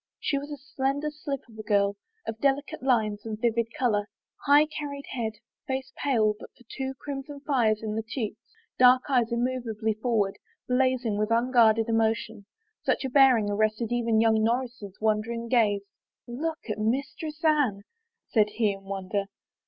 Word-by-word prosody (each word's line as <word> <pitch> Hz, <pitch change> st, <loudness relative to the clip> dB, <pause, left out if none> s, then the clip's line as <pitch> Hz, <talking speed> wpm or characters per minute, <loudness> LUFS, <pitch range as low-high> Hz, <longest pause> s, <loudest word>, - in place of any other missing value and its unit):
She 280 Hz, -, 0 dB
was 285 Hz, +1 st, -8 dB
a 295 Hz, -, -5 dB
slender 275 Hz, +2 st, -2 dB
slip 290 Hz, -2 st, -5 dB
of 220 Hz, -2 st, -15 dB
a -, -, -2 dB
girl, 200 Hz, -2 st, +2 dB, 0.3 s
of 225 Hz, 0 st, -5 dB
delicate 280 Hz, +1 st, 0 dB
lines 220 Hz, -5 st, +1 dB
and 220 Hz, -1 st, -5 dB
vivid 230 Hz, 0 st, +1 dB
color. 215 Hz, -7 st, +1 dB, 0.4 s
High 290 Hz, +2 st, +7 dB
carried 290 Hz, -2 st, -6 dB
head, 225 Hz, -4 st, -2 dB, 0.3 s
face 265 Hz, 0 st, -3 dB
pale 225 Hz, -7 st, +2 dB
but -, -, -10 dB
for 245 Hz, -, -19 dB
two 265 Hz, 0 st, -3 dB
crimson 280 Hz, +1 st, -7 dB
fires 230 Hz, -7 st, +1 dB
in 215 Hz, -1 st, -2 dB
the 220 Hz, -, -1 dB
cheeks^ 225 Hz, -1 st, -4 dB, 0.4 s
dark 255 Hz, 0 st, +7 dB
eyes 245 Hz, -4 st, +2 dB
immovably 235 Hz, -3 st, -1 dB
forward, 215 Hz, -3 st, 0 dB, 0.3 s
blazing 250 Hz, -4 st, +1 dB
with 215 Hz, +1 st, 0 dB
unguarded 230 Hz, -2 st, +4 dB
emotion 225 Hz, -2 st, 0 dB, 0.2 s
— 435 Hz, 0 st, -50 dB
such -, -, 0 dB
a -, -, -1 dB
bearing 255 Hz, -6 st, +5 dB
arrested 215 Hz, +2 st, 0 dB
even 230 Hz, -2 st, +2 dB
young 220 Hz, -1 st, +3 dB
Norris's 235 Hz, -4 st, -2 dB
wandering 220 Hz, +2 st, 0 dB
gaze. 215 Hz, -5 st, +2 dB, 0.3 s
" -, -, -66 dB
Look 310 Hz, +6 st, -3 dB
at 215 Hz, -1 st, -3 dB
Mistress 280 Hz, +7 st, -2 dB
Anne," 275 Hz, -11 st, +2 dB, 0.4 s
said 210 Hz, -2 st, +3 dB
he 210 Hz, 0 st, +1 dB
in 195 Hz, 0 st, -12 dB
wonder. 195 Hz, +1 st, -2 dB
235 Hz, 165 wpm, -27 LUFS, 215-265 Hz, 0.4 s, High